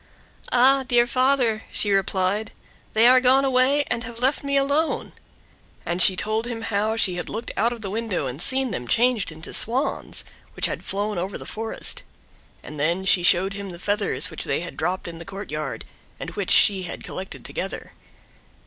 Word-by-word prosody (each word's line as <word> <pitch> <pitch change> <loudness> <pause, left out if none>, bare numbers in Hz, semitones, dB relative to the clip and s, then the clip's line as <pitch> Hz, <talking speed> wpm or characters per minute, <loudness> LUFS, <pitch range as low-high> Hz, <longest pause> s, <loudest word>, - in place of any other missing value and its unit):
"Ah, 265 +2 +5
dear 240 -2 +2
father," 255 -3 +1
she 205 - +1
replied, 195 +2 0 0.4
"they 220 +1 +5
are 255 +1 +7
gone 260 +2 +4
away 265 +2 +3
and 245 -4 -2
have 230 0 -8
left 260 +5 0
me 280 0 0
alone;" 285 +4 0 0.7
and 175 +1 -1
she 185 - +8
told 215 +4 -1
him 230 -2 -5
how 215 0 -1
she 185 -5 +1
had 175 - -5
looked 230 +2 -5
out 230 +4 +1
of 235 -2 -7
the 200 - -5
window 215 -7 -2
and 130 +4 -5
seen 260 +3 +1
them 125 -10 -5
changed 235 - +2
into 160 +1 -9
Swans, 250 +5 +1 0.3
which - - +2
had - - -3
flown 205 -1 -2
over 190 +3 -4
the - - -10
forest; 225 +1 -3 0.6
and 150 -1 -9
then 170 +6 0
she 185 -1 +4
showed 185 +3 +4
him 200 0 -7
the 175 - -8
feathers 185 -4 +1
which 160 - 0
they - - -1
had 175 - -8
dropped 180 +3 -2
in 165 -1 -8
the - - -8
courtyard, 190 -5 -6 0.3
and - - -6
which - - -4
she 195 -3 +5
had 180 - -7
collected 190 +1 -8
together. - - -6
215 Hz, 185 wpm, -23 LUFS, 185-245 Hz, 0.7 s, she